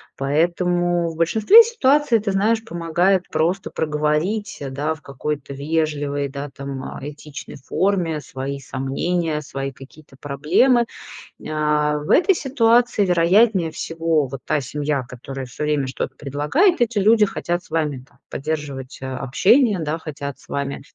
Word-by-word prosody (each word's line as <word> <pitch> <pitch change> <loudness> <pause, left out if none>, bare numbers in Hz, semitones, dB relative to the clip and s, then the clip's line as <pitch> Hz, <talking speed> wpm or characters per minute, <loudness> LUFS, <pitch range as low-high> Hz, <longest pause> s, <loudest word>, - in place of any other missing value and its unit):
Поэтому 175 +4 +1
в 165 - -9
большинстве 220 - +7
ситуаций, 295 - +2
ты 205 -1 -2
знаешь, 220 +4 +1
помогает 175 0 +1
просто 180 +5 0
проговорить, 155 +6 -1
да, 145 +4 -2
в 160 - -13
какой-то 140 0 -5
вежливой, 145 -1 -1
да, 140 +1 -6
там, 140 -1 -6
а, - - -7
этичной 150 +1 -9
форме 165 +2 0
свои 140 0 -5
сомнения, 150 +5 -2
свои 135 -1 -5
какие-то 135 +2 -15
проблемы. 175 - +3 0.6
А, 150 -1 +1
в 150 - -8
этой 390 +3 +5
ситуации, 240 -6 +2
вероятнее 180 +1 +3
всего, 165 -1 0
вот 130 0 -8
та 150 - +1
семья, 145 +1 -2
которая 135 +2 -7
всё 125 +4 -6
время 150 -3 0
что-то 130 0 -4
предлагает- 150 - +1
эти 235 -2 +1
люди 215 +2 +5
хотят 175 -3 -3
с - - -20
вами 150 -5 -1
там - - -27
поддерживать 140 -3 -5
общение, 175 - +2
да, 160 0 -2
хотят 140 -3 -6
с - - -21
вами 140 -1 -3
155 Hz, 140 wpm, -21 LUFS, 140-190 Hz, 0.6 s, большинстве